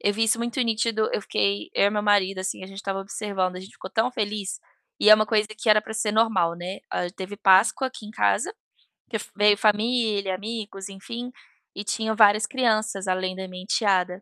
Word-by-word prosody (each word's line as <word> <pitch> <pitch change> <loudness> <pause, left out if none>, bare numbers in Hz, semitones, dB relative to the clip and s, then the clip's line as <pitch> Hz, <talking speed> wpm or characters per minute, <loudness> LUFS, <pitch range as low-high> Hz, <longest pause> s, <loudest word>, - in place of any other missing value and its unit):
Eu 205 - +1
vi 225 +2 +1
isso 225 +1 +2
muito 235 +2 -2
nítido, 225 -2 0
eu - - 0
fiquei 100 - -1
eu - - +3
e 205 - +2
meu 210 0 -1
marido, 200 -2 +2
assim, 185 0 -4
a - - -7
gente 195 +1 -10
tava 195 -1 -3
observando, 195 -2 -3
a - - -7
gente 190 +2 -12
ficou - - -9
tão 235 +3 0
feliz 210 -4 -3 0.4
e - - +5
é - - +12
uma 215 0 +2
coisa 215 0 +2
que 225 - -3
era 215 0 +6
pra 220 +1 -9
ser 215 -1 -1
normal, 205 -7 +2
né? 180 +3 -6
Ah, 180 - -2
teve 195 +2 -8
Páscoa 205 +7 +4
aqui 255 - -12
em - - -9
casa, 350 - +1 0.6
que - - -5
f - - -10
veio 205 0 +4
família, 210 -2 +1
amigos, 205 -1 -6
enfim. 235 +6 -7 0.4
E 200 - -5
tinha 220 +1 -1
várias 215 -1 +5
crianças 220 -6 0
além 185 0 -1
da 190 0 -6
minha 185 0 -9
enteada. 190 -3 +1
205 Hz, 215 wpm, -24 LUFS, 190-220 Hz, 0.6 s, é